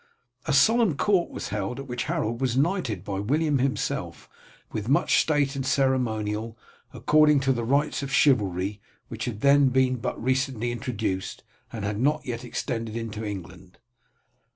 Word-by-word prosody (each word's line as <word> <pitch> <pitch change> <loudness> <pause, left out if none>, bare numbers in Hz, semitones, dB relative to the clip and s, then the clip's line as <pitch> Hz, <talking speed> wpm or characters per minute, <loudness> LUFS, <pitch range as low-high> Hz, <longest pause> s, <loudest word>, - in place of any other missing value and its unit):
A - - +1
solemn 195 - +4
court 190 -1 +2
was - - -6
held, 105 +5 -3
at 135 - -6
which 125 -2 -4
Harold 140 -8 -2
was 130 -2 0
knighted 140 - 0
by 100 -1 -4
William 145 +6 +1
himself 135 +1 -2 0.4
with 110 +2 -4
much 145 - +4
state 145 -3 +1
and 135 - -2
ceremonial, 115 -5 0 0.3
according 150 -1 +4
to 135 -1 +2
the 120 -2 -3
rites 140 +6 +1
of 140 -1 -5
chivalry, 100 -8 +2 0.3
which - - -5
had 110 -3 -5
then 140 -1 +5
been 130 0 +2
but 115 - -4
recently 130 -1 -1
introduced, 110 -5 -3 0.3
and 110 -3 -5
had 105 0 -2
not 150 +5 +2
as - - -24
yet 120 0 -4
extended 115 -2 -4
into 110 -1 -5
England. 90 -3 -8
125 Hz, 160 wpm, -26 LUFS, 110-140 Hz, 0.4 s, then